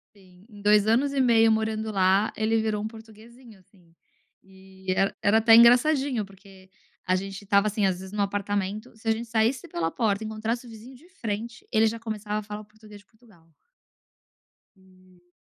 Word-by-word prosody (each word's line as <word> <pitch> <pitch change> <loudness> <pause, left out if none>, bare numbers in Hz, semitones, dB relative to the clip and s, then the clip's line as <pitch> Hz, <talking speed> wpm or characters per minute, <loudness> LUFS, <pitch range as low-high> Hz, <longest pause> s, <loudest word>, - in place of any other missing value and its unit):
Sim, 185 0 -21
em 205 -1 -14
2 210 0 +4
anos 270 +5 +2
e 270 - +1
meio 225 -2 +4
morando 220 0 -1
lá, 195 +2 +2
ele 220 +1 0
virou 215 -1 -2
um - - -2
portuguezinho 225 +1 -15
assim. 175 -2 -26 0.5
E 190 0 -9
era 195 - +1
era 205 +2 +4
até 225 0 +6
engraçadinho 245 0 +4
porque 195 -1 -18 0.4
a 185 - +3
gente 195 +1 -5
estava 200 +1 +2
assim, 210 -1 0
às 185 -2 0
vezes, 190 0 -10
no 210 -1 -2
apartamento, 205 +3 -3
se 225 +1 -13
a - - +4
gente 230 +1 -3
saísse 230 +8 0
pela 165 -1 -2
porta 215 0 -1
e - - -5
encontrasse 225 +3 -4
o - - -12
vizinho 230 +4 -12
de 325 +8 -19
frente, 230 - -6
ele 220 0 +3
já 230 +1 -3
começava 215 -1 -4
a - - -8
falar 210 +1 -8
português 215 0 -16
de - - -30
Portugal. 210 -8 -25 1.3
E 185 -1 -24
215 Hz, 185 wpm, -25 LUFS, 195-225 Hz, 1.3 s, até